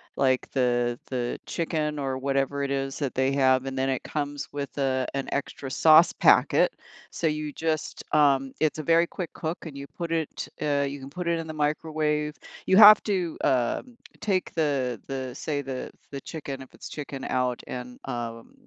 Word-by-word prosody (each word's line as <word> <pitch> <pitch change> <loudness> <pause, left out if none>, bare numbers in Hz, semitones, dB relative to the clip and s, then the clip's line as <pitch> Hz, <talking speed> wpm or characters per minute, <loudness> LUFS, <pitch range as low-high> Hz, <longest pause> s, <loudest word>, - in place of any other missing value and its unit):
like, 130 -1 +1
the 120 -2 +1
the 125 -2 -2
chicken 155 -3 -2
or 135 -2 -2
whatever 135 +1 0
it 140 - -2
is 135 0 -2
that 140 -4 -2
they 130 +1 +2
have, 130 -1 +3
and 135 0 -4
then 135 0 +1
it 130 -2 -1
comes 145 -1 -3
with, 140 -1 -5
uh, 130 -2 +1
an 135 0 -2
extra 140 -1 -3
sauce 160 +4 +6
packet, - - +4 0.4
so 165 - -1
you 150 -1 -2
just 160 -1 -2
um, 135 -3 +4
it's 155 0 +1
a - - -3
very 165 +2 +4
quick 175 -2 -6
cook, 160 +3 -3
and 150 -4 -8
you 140 - -6
put 170 +2 -6
it, 165 -2 -2
uh, 145 -2 +1
you 140 +1 -6
can 135 0 -9
put 175 +4 -5
it 170 -1 +1
in 165 - -4
the 155 - -5
microwave, 150 0 -1 0.3
you 190 - +4
have 210 0 +10
to, 185 -6 -1
um, 130 - 0 0.3
take 190 -3 0
the 135 -7 0
the, 130 -2 -4
say, 145 -2 -2
the 130 -2 -5 0.2
the 140 -1 -6
chicken, 140 -4 -6
if 130 - -18
it's - - -10
chicken 140 -2 -6
out, 125 -1 0
and, 125 0 -7
um, 115 -3 -5
140 Hz, 190 wpm, -26 LUFS, 130-155 Hz, 0.4 s, have